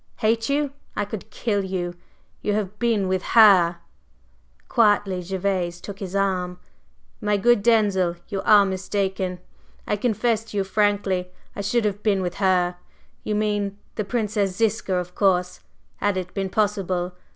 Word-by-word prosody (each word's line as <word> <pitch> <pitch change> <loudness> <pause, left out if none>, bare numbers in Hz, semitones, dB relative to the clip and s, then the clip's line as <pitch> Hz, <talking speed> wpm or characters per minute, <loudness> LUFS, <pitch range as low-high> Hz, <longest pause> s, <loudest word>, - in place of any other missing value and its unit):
"Hate 225 +2 +1
you? 285 0 +1 0.2
I 205 - -1
could 205 -1 -7
kill 205 -4 -1
you! 180 -2 -3 0.5
You 210 - 0
have 210 -1 -3
been 225 -5 +1
with 185 0 0 0.2
her!" 185 -6 +7 0.9
Quietly 205 -5 +2
Gervase 180 -1 -2
took 200 +1 -9
his 195 -1 -6
arm. 185 -2 0 0.6
"My 210 -1 +1
good 240 +2 +4
Denzil, 200 -6 +3
you 195 -2 -3
are 205 -2 +6
mistaken! 190 -1 -2 0.5
I - - 0
confess 225 0 0
to 215 - -7
you 195 - +2
frankly 195 -2 0 0.3
I - - -3
should 215 +3 0
have 205 0 -1
been 200 -3 +1
with 175 -1 -4
her 180 -2 +2 0.5
you 210 - -1
mean 205 -1 -1 0.2
the 215 - -2
Princess 205 -3 -1
Ziska, 220 -3 0
of 180 0 -3
course 180 -2 +1 0.4
had 205 -2 0
it 180 -1 -5
been 195 -1 -2
possible. 185 -3 -1
200 Hz, 150 wpm, -23 LUFS, 185-210 Hz, 0.9 s, her